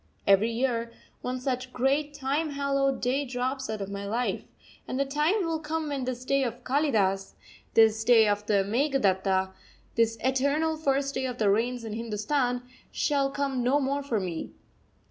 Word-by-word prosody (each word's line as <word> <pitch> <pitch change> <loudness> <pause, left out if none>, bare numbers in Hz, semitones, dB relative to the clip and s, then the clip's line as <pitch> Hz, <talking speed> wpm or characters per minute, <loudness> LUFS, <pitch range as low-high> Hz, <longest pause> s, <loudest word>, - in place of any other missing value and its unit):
Every 200 +3 +5
year 235 -1 -1 0.3
one 255 +1 -3
such 255 0 -3
great, 280 +4 +1
time 285 +4 -1
hallowed 275 -1 0
day 260 +3 +1
drops 260 0 -3
out 215 -2 -3
of 195 0 -5
my 200 0 -5
life; 235 +4 -1 0.4
and 255 - -3
the 275 - +2
time 305 +8 +1
will 325 -1 -1
come 310 0 -3
when 275 -3 -2
this 255 0 -4
day 275 +1 +2
of 245 0 -4
Kalidas, 215 -9 +1 0.4
this 220 -1 +5
day 225 -2 +6
of 205 0 +1
the 200 -2 +3
Meghaduta, 195 -6 +1 0.4
this 230 -1 +2
eternal 280 +5 +1
first 275 -2 0
day 260 -1 -1
of 250 -1 -5
the 210 -4 +3
Rains 240 +3 0
in 220 -2 -5
Hindustan, 245 +3 -1 0.3
shall 280 -2 +1
come 275 -2 -1
no 255 +4 +3
more 280 +1 0
for 250 -6 -1
me. 175 -4 -4
255 Hz, 170 wpm, -27 LUFS, 225-280 Hz, 0.4 s, day